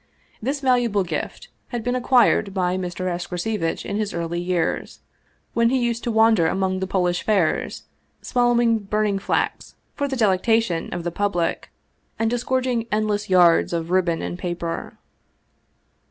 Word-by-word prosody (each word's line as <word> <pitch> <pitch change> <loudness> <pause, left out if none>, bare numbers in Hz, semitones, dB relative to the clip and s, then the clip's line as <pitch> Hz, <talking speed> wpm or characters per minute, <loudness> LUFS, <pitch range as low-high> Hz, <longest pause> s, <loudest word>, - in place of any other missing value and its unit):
This 275 +5 -2
valuable 245 -6 +2
gift 175 - -5 0.2
had 240 -3 -4
been 245 +1 0
acquired 245 -5 +3
by 180 -1 +1
Mr. 185 0 -3
Escrocevitch 175 +1 -2
in 200 - -3
his 210 -1 -2
early 170 0 -2
years, 175 -1 -2 0.5
when 230 0 +3
he 260 - +2
used 235 -2 -1
to 240 - 0
wander 220 -6 +4
among 190 0 0
the 190 - -2
Polish 180 -2 0
fairs, 195 -7 0 0.4
swallowing 240 -2 +2
burning 210 0 0
flax - - -2 0.2
for 285 - -2
the 270 - -3
delectation 215 -3 +1
of 175 - -4
the 175 - -2
public 175 -3 -1 0.5
and 225 0 0
disgorg 255 +1 0
ing 235 -3 -1
endless 210 -1 0
yards 175 -2 +5
of 165 0 -2
ribbon 175 -3 +1
and 175 - -5
paper. 175 -2 -4
200 Hz, 150 wpm, -22 LUFS, 175-235 Hz, 0.5 s, yards